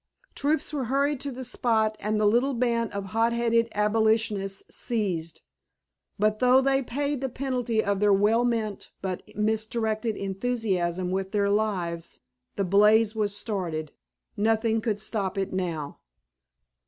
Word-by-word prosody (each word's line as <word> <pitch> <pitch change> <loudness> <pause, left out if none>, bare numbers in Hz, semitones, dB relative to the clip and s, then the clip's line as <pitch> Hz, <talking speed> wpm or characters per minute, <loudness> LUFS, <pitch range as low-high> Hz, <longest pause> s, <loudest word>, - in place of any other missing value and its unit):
Troops 300 +2 0
were 275 -4 -1
hurried 280 +3 +1
to 280 +1 -4
the 260 +1 -6
spot 220 -3 +1
and 210 +1 -1
the 215 - +2
little 245 +6 +3
band 235 -2 0
of 200 -1 -4
hot 230 +1 +2
headed 230 -1 +2
abolitionists 210 -2 +1
seized. 190 -9 -2 0.8
But 215 +1 +1
though 255 +1 +6
they 270 0 +2
paid 280 +2 -2
the 265 - -1
penalty 245 -4 -1
of 200 -1 0
their 205 0 +4
well 210 +4 +4
meant 225 -4 -2
but 185 -2 -3 0.2
misdirected 220 0 -1
enthusiasm 190 -4 -1
with 190 +1 -2
their 200 -1 +2
lives, 180 -6 -1 0.4
the 200 - 0
blaze 210 +3 +5
was 205 -2 0
started. 170 -9 -3 0.4
Nothing 220 +1 +1
could 210 -2 -1
stop 200 -2 -2
it 195 -1 -2
now. 165 -6 -3
220 Hz, 140 wpm, -26 LUFS, 200-235 Hz, 0.8 s, though